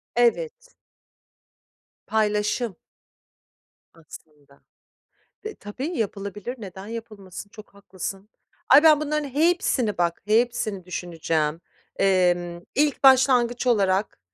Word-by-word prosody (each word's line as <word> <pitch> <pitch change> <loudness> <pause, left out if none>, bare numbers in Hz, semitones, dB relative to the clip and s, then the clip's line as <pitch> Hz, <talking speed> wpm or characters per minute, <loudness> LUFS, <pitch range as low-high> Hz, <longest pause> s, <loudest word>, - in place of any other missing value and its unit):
Evet. 485 - 0 1.3
Paylaşım 210 0 0 1.2
aslında. 150 -3 -16 0.8
Dı 435 - -5
tabii 230 +8 -6
yapılabilir. 205 +2 -4
Neden 195 -1 -9
yapılmasın? 210 -4 -9
Çok 215 -1 -14
haklısın. 195 +1 -7 0.4
Ay, 285 +4 +8
ben 305 -2 +6
bunların 300 -1 -1
hepsini 285 - +1
bak, 170 -1 0
hepsini 215 -4 0
düşüneceğim. 165 -3 -2 0.3
Emm, 175 -2 +1
ilk 290 0 +1
başlangıç 255 -2 +4
olarak, 200 -3 +1
210 Hz, 90 wpm, -24 LUFS, 185-250 Hz, 1.3 s, Ay